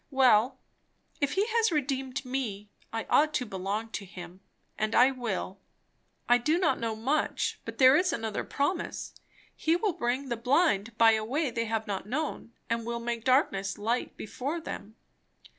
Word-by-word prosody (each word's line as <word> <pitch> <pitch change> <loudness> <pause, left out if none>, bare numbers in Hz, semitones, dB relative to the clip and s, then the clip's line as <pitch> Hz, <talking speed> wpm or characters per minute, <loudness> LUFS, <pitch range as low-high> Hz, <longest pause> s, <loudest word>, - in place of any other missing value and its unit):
Well, 255 -4 +4 0.6
if 285 -2 0
he 395 +2 +2
has 450 -2 +2
redeemed 270 -3 -2
me, 220 -6 -4 0.2
I 225 0 -3
ought 305 +1 +3
to 250 - 0
belong 205 +2 -3
to 210 - -5
him, 180 -1 -10 0.3
and 215 +1 -1
I 255 +2 +6
will! 215 -6 -4 0.7
I 245 0 +5
do 305 +7 +2
not 320 -8 +2
know 225 -1 -2
much, 270 +8 -1
but - - -7
there 260 -1 +7
is 360 +4 +3
another 220 -2 -2
promise; 310 +5 -2 0.4
he 325 +1 +2
will 380 +2 0
bring 255 +1 -2
the 235 - -1
blind 230 - +2
by 225 -1 +7
a 220 -1 +1
way 275 +5 -1
they 230 0 -1
have 225 -1 -2
not 200 -1 -4
known, 285 -3 -3 0.2
and 230 0 -1
will 235 +1 -3
make 235 -1 -3
darkness 225 -7 +2
light 230 +4 -2
before 275 +9 -4
them. 220 -9 -7
240 Hz, 170 wpm, -29 LUFS, 220-280 Hz, 0.7 s, there